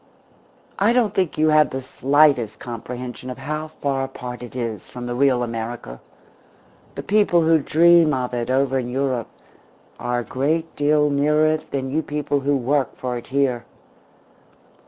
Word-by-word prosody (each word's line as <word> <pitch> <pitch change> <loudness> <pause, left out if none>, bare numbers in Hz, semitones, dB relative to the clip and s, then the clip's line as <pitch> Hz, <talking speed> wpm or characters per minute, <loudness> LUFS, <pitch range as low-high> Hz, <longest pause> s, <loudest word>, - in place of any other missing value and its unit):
I 210 +4 +4
don't 240 -4 +2
think 185 -4 -1
you 155 0 +3
have 155 -3 +4
the 130 0 -5
slightest 135 -5 +2
comprehension 125 +1 -7
of 125 - -6
how 150 +3 -4
far 140 -3 -2
apart 125 -2 -8
it 120 -1 -10
is 115 -5 -4
from 125 -1 -7
the 120 - -3
real 130 -1 +2
America. 115 - -6 0.9
The - - -5
people 200 -5 +3
who 160 0 +4
dream 165 +2 +5
of 125 -3 -2
it 120 0 -2
over 135 0 +1
in 120 -1 -4
Europe 130 -2 -1 0.7
are 120 0 -1
a - - -7
great 155 +8 -2
deal 150 0 +2
nearer 150 +2 +2
it 155 0 0
than 135 -1 -3
you 155 +3 +1
people 145 -1 -2
who 140 +1 +1
work 135 +2 -1
for 125 -1 -3
it 120 - -7
here. 130 -3 0
135 Hz, 165 wpm, -22 LUFS, 125-150 Hz, 0.9 s, dream